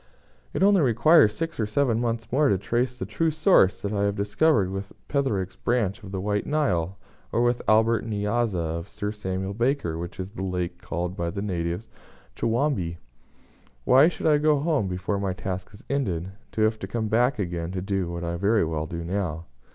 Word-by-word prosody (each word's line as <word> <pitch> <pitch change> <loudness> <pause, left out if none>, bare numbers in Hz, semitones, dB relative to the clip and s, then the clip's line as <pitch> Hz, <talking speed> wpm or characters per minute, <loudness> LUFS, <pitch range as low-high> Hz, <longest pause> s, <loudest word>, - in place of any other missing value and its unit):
It - - 0
only 200 -2 +5
requires 120 -2 +5
six 165 -3 -3
or 110 - +1
seven 115 0 +1
months 115 -1 -2
more 140 +2 +3
to 100 - +3
trace 120 +5 -1
the 95 - -4
true 160 - 0
source 155 - +3
that 100 +1 -2
I 100 - 0
have 100 0 0
discovered 105 - +2
with 95 0 -5 0.2
Petherick's 105 -10 -1
branch 120 -3 0
of 95 -3 -10
the 95 - -3
White 105 +1 -1
Nile, 95 - 0 0.3
or 120 - +2
with 120 0 +2
the - - -5
Albert 110 +1 +4
N'Yanza 105 +1 0 0.2
of 85 - -9
Sir 105 0 -4
Samuel 95 -2 -3
Baker, 115 - 0
which 85 +1 -7
is 95 +1 -5
the 100 - -7
lake 90 -2 -3
called 90 +2 -3
by 85 -2 -2
the 100 +3 -4
natives 90 0 -2 0.5
'Chowambe.' 115 - 0 0.9
Why 135 +4 +7
should 175 - -3
I 150 -2 +5
go 150 -1 +3
home 150 - +1
before 95 +2 -2
my 95 -2 -1
task 95 -1 -5
is 100 - -15
ended, 95 -11 -1 0.2
to 110 - -1
have 110 0 +2
to - - -5
come 115 -2 -2
back 120 +5 +2
again 85 -4 -3
to 95 - -2
do 95 -3 -1
what 85 0 -5
I 85 - -2
can 85 - -4
very 105 0 +3
well 80 -1 -2
do 85 +1 -5
now?" 85 -3 -3
105 Hz, 205 wpm, -25 LUFS, 95-120 Hz, 0.9 s, Why